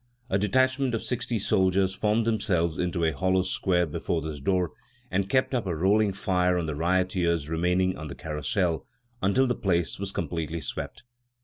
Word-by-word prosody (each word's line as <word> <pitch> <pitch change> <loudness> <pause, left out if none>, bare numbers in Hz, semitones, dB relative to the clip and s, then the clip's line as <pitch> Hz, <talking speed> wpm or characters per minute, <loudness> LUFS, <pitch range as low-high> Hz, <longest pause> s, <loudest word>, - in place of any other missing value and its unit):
A 95 - +3
detachment 130 +4 +2
of 115 - -3
sixty 120 -1 -1
soldiers 95 -1 +2
formed 105 +3 +1
themselves 95 -7 0
into 90 -1 -1
a 80 - +2
hollow 95 +5 +1
square 90 -1 +1
before 80 +2 -2
this 80 -2 -5
door 90 +4 +1 0.4
and 95 +1 0
kept 130 +4 +2
up 120 -6 0
a 85 - -1
rolling 100 +5 +3
fire 90 -2 +1
on 85 - -1
the 75 - -2
rioters 85 -1 +1
remaining 90 +3 +1
on 80 0 -7
the - - -7
Carrousel 80 +3 -1 0.3
until 100 +8 +3
the 125 - +1
place 90 -6 0
was 100 -1 -3
completely 85 -3 -3
swept. 75 - -5
95 Hz, 175 wpm, -27 LUFS, 85-100 Hz, 0.4 s, A